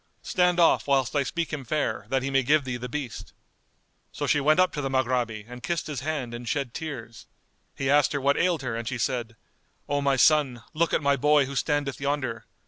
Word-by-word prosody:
Stand 180 -1 +2
off, 170 - +4
whilst 135 -1 +1
I 145 - +3
speak 165 +4 -3
him 145 -3 -3
fair, 150 +5 -2
that 135 -1 0
he 135 - -2
may 135 0 +3
give 145 +3 +3
thee 130 -2 -3
the 125 +1 -6
beast." 140 -3 -6 0.8
So - - -4
she 145 - +2
went 155 +4 +3
up 185 - +3
to 150 - -3
the 135 - -2
Maghrabi 120 -5 -1
and 125 0 -10
kissed 170 +5 -2
his 150 -4 -4
hand 135 -4 -3
and 120 0 -6
shed 135 -3 -2
tears. 125 -8 -7 0.5
He 135 - -2
asked 145 +1 +4
her 145 - 0
what 140 +1 +2
ailed 170 -5 +1
her 120 -3 -3
and 115 0 -5
she 125 0 -2
said, 120 -1 -2 0.5
"O 145 0 0
my 140 -1 +2
son, 135 -4 +3
look 165 +2 +1
at - - +1
my 140 0 +3
boy 150 +1 +4
who 140 +1 -7
standeth 145 0 -1
yonder. 135 -5 -2
140 Hz, 225 wpm, -26 LUFS, 125-150 Hz, 0.8 s, off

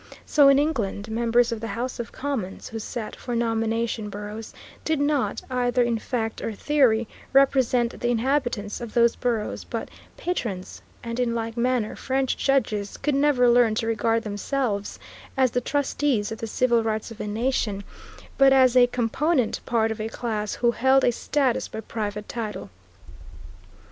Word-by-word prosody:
So 290 -2 +5
in 275 0 +7
England 230 -8 -1
members 235 +1 +2
of 225 -2 -4
the 230 - -3
House 240 +5 -4
of 235 - -5
Commons, 255 -9 -4
who 225 - -5
sat 220 0 -5
for 245 -1 -5
nomination 225 -1 -1
boroughs, 210 +2 -7 0.3
did 315 -2 0
not, 285 -2 0
either 245 0 +2
in 235 -1 0
fact 225 -2 -3
or 225 - -3
theory, 235 -3 +2 0.3
represent 260 -3 +3
the 240 - -1
inhabitants 240 -4 0
of 235 -3 -7
those 235 -1 +4
boroughs, 235 -4 -2
but - - -5 0.3
patrons; 225 - -4 0.2
and 230 0 -4
in 235 -2 +1
like 225 0 -3
manner 240 -2 0
French 265 0 -1
judges 215 -7 0
could 295 +1 -1
never 275 -3 +3
learn 235 -2 +4
to 225 - -1
regard 225 0 +1
themselves 210 0 -2 0.4
as 260 -2 +3
the 245 - 0
trustees 275 -5 0
of 225 - -5
the 225 - -4
civil 235 +1 +2
rights 220 0 -2
of 225 - -10
a - - -4
nation, 215 -2 -1 0.6
but 275 0 +7
as 260 -2 +5
a 245 -1 +7
component 250 +3 0
part 225 -2 +2
of 220 0 -4
a 220 - -3
class 215 -3 -3
who 240 -1 +2
held 265 +3 +3
a - - +4
status 260 +1 0
by - - -7
private 210 -1 -4
title. 215 - -5
235 Hz, 165 wpm, -25 LUFS, 220-260 Hz, 0.6 s, in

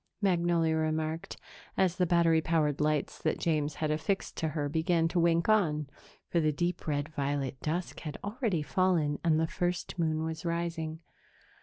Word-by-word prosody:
Magnolia 170 -4 +2
remarked, 155 +1 -2 0.4
as 185 -2 +2
the 180 -2 +2
battery 165 -1 +4
powered 155 -3 +1
lights 150 -1 0
that - - 0
James 150 -3 0
had 155 -1 -1
affixed 160 +6 -1
to 160 - 0
her 150 -1 -2
began 165 +2 +2
to 175 - 0
wink 170 0 +3
on, 155 -10 +2 0.4
for 170 - +1
the 155 -1 +2
deep 175 +4 -2
red 145 -1 0
violet 140 -3 -2
dusk 170 +4 -2
had 150 -3 -6
already 205 - -1
fallen 165 -4 +1
and 160 -2 +3
the 160 - +2
first 175 +2 -2
moon 160 -1 +1
was 160 0 -4
rising. 170 -1 -2
160 Hz, 165 wpm, -30 LUFS, 155-175 Hz, 0.4 s, battery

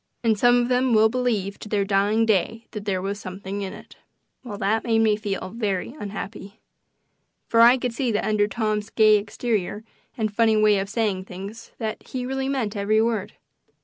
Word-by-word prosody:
And 225 -2 +3
some 245 +3 +4
of 240 - +1
them 250 -1 +2
will 220 +1 +5
believe 220 -5 -1
to 210 - -9
their 205 -2 +1
dying 205 +3 +2
day 225 +2 0
that 210 -2 -7
there 190 -2 -1
was 200 +1 -3
something 190 +1 -6
in 195 -1 -4
it." - - -13 0.5
Well, 215 -5 -7
that 220 +2 0
made 225 -2 +1
me 220 -1 +4
feel 200 -3 -4
very 210 -1 -2
unhappy. 200 0 -7 0.9
For 230 - +4
I 240 +2 +8
could 245 -2 -3
see 245 0 -1
that 210 - 0
under 210 -1 +2
Tom's 215 -1 -2
gay 215 -1 +5
exterior 210 0 -2 0.3
and 215 -2 -1
funny 220 0 +3
way 210 -1 +4
of 195 0 -3
saying 205 -4 -1
things 195 +5 -9 0.3
he 250 -1 -6
really 265 +1 -2
meant 240 -6 -2
every 205 +2 +2
word. 225 -3 0
215 Hz, 185 wpm, -24 LUFS, 200-230 Hz, 0.9 s, I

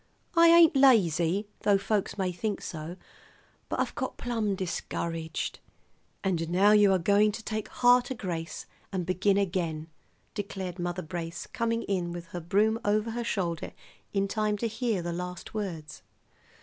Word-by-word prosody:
"I 335 0 +7
ain't 335 -2 +7
lazy, 200 - +4
though 205 -1 +3
folks 205 0 -1
may 190 -2 0
think 205 +4 -3
so; 160 +1 -6 0.7
but - - -2
I've - - 0
got - - -4
plum 225 -5 -1
discouraged." 165 -3 -3 0.6
"And 170 -4 0
now 190 +4 +5
you 210 -2 +6
are 190 - +4
going 205 +4 +3
to 220 - -7
take 215 -1 -3
heart 245 +1 +4
o' - - -2
grace 170 -6 -5 0.3
and 185 -3 -2
begin 195 +2 +2
again," 170 -5 -1 0.4
declared 190 -3 -5
Mother 175 +1 -2
Brace, 165 0 -5
coming 230 0 -1
in 180 -3 -1
with 170 -1 -8
her 175 - -5
broom 210 +6 +2
over 210 +2 +1
her 240 +1 -3
shoulder 175 -7 -2 0.4
in 195 -1 +1
time 210 0 0
to 230 - -1
hear 225 -4 -1
the 170 0 -3
last 180 +1 -6
words. 175 -8 -5
195 Hz, 160 wpm, -28 LUFS, 175-215 Hz, 0.7 s, I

